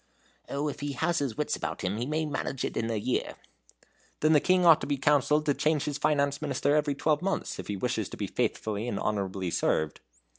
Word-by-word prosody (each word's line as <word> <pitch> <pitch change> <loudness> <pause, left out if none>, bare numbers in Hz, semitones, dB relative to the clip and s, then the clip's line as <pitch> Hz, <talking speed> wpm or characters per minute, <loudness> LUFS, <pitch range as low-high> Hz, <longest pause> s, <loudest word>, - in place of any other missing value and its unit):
"Oh, 145 +2 -1
if 145 - -4
he 145 0 -3
has 170 +4 0
his 135 -6 -2
wits 150 0 0
about - - -4
him, 95 +2 -1
he 120 +3 -2
may 155 +1 0
manage 145 -3 -3
it - - -4
in 115 0 -1
a 115 - -1
year." 110 +4 -1 0.9
"Then 155 +1 +4
the 150 - +6
King 180 +3 +3
ought 165 -2 +7
to - - -4
be 145 -1 0
counselled 145 +2 +3
to 145 - +3
change 150 +1 +1
his 145 -1 -3
finance 140 -1 +1
minister 145 0 +1
every 150 -2 +1
twelve 150 +2 +1
months, 195 +1 -2
if - - -6
he 100 - -3
wishes - - -1
to - - -9
be - - -2
faithfully 110 +1 -2
and 100 -4 -2
honorably 95 -3 -2
served." 80 -2 0
145 Hz, 225 wpm, -28 LUFS, 115-150 Hz, 0.9 s, ought